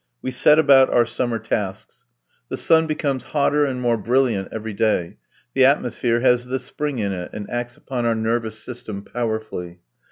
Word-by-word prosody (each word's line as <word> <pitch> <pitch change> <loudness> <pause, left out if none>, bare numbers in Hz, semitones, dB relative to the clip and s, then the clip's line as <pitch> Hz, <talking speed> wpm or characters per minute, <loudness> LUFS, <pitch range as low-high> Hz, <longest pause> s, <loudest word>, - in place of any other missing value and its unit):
We 130 - -2
set 150 +4 +5
about 135 -4 +6
our 120 - +4
summer 120 0 -2
tasks. 105 -3 -4 0.4
The - - -3
sun 160 -1 +3
becomes 140 -5 -1
hotter 145 +1 +3
and 130 -2 -3
more 120 -2 +1
brilliant 115 -3 +1
every 110 -1 -5
day; 100 -5 0 0.4
the 130 -1 +5
atmosphere 120 -3 +1
has 125 -1 +3
the 130 +1 -1
spring 135 +2 -4
in 100 -3 -1
it, 90 -1 -5
and 105 -1 -6
acts 120 0 -4
upon 125 -3 -3
our 115 - +2
nervous 110 0 -1
system 110 -3 -7
powerfully. 110 -8 -4
120 Hz, 170 wpm, -22 LUFS, 110-130 Hz, 0.4 s, about